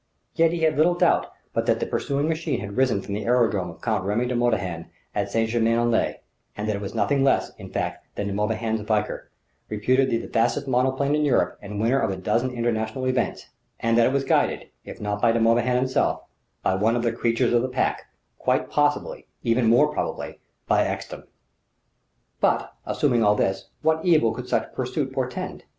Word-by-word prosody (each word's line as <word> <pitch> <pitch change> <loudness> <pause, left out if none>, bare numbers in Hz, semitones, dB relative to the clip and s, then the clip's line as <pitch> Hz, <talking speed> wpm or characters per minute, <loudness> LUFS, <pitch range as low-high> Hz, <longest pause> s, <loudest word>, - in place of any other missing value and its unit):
Yet 165 -1 +3
he 170 -1 -3
had 160 -3 +2
little 170 +3 +4
doubt - - +3 0.3
but - - -1
that - - +2
the - - -1
pursuing 140 +2 -1
machine 160 -5 -1
had 100 0 -6
risen 125 -7 +2
from 100 - -6
the 105 0 -3
aerodrome 115 -7 +2
of 80 0 -12
Count 110 -5 0
Remy 105 +5 0
de 125 0 -2
Morbihan 100 -9 -1 0.3
at 100 -1 -1
St. 115 +2 +1
Germain 115 0 +2
en 120 0 +2
Laye; 115 - 0 0.4
that 105 +1 -3
it 100 -1 -1
was 100 - -6
nothing 140 -2 +2
less, 135 - +2
in - - -9
fact, - - -3
than 100 - -3
De 100 - -3
Morbihan's 110 +2 -1
Valkyr, 105 -1 -2 0.4
reputed 130 +5 +2
the 115 -1 -1
fastest 115 +4 0
monoplane 130 +2 +1
in 150 0 +2
Europe 145 -3 +1
and 105 0 -6
winner 120 +5 +2
of 110 - 0
a 95 - -2
dozen 120 +7 0
International 120 +1 -2
events; 130 0 -1 0.3
and 115 0 +1
that 115 0 +5
it - - +1
was 140 0 +1
guided, - - +1
if - - -10
not 105 0 -3
by 115 - +4
De 115 - +1
Morbihan 120 +2 +3
himself, 130 +1 +1 0.4
by - - +2
one 110 +5 +2
of 120 - -1
the 115 - +2
creatures 120 +1 +1
of 120 - +4
the 130 - -2
Pack 125 - -1 0.3
quite - - 0
possibly, 145 0 0 0.2
even 115 0 +2
more 135 +7 +4
probably, - - -4 0.3
by - - +3
Ekstrom! - - -5 1.1
But - - +1
assuming 120 -6 +2
all 105 0 +4
this 95 -1 -1
what 160 0 +2
evil 155 -11 +4
could 125 +2 -7
such - - -1
pursuit 130 +2 -2
portend? 130 -2 -4
120 Hz, 200 wpm, -24 LUFS, 110-130 Hz, 1.1 s, that